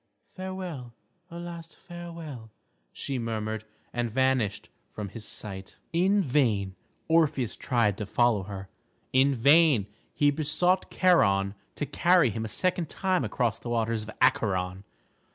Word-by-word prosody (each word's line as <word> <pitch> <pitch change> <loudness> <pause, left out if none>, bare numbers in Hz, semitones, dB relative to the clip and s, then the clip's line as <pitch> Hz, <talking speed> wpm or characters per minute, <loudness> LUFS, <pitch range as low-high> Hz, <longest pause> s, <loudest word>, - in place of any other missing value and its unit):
"Farewell, 185 -10 -6 0.3
a 170 - -8
last 170 -1 -8
farewell," 170 -9 -9 0.4
she 135 -2 -3
murmured, 110 -1 -3 0.3
and 120 -1 -1
vanished 115 -4 0 0.2
from 105 -2 -6
his 110 +3 -9
sight. 95 -2 -7 0.2
In 190 +4 +3
vain 110 - +1 0.3
Orpheus 155 -8 +2
tried 115 -5 +1
to 105 - -4
follow 120 -1 +3
her, 95 -1 -7 0.5
in 135 +1 +4
vain 140 - +5 0.3
he 145 -1 +3
besought 160 +6 +1
Charon 100 - +3 0.2
to 145 - -2
carry 175 -5 +3
him 110 +2 -3
a - - -5
second 175 - -1
time 185 -6 0
across 115 0 -1
the 120 - -7
waters 115 -1 0
of 110 - -9
Acheron. 95 -7 +1
125 Hz, 135 wpm, -28 LUFS, 110-165 Hz, 0.5 s, vain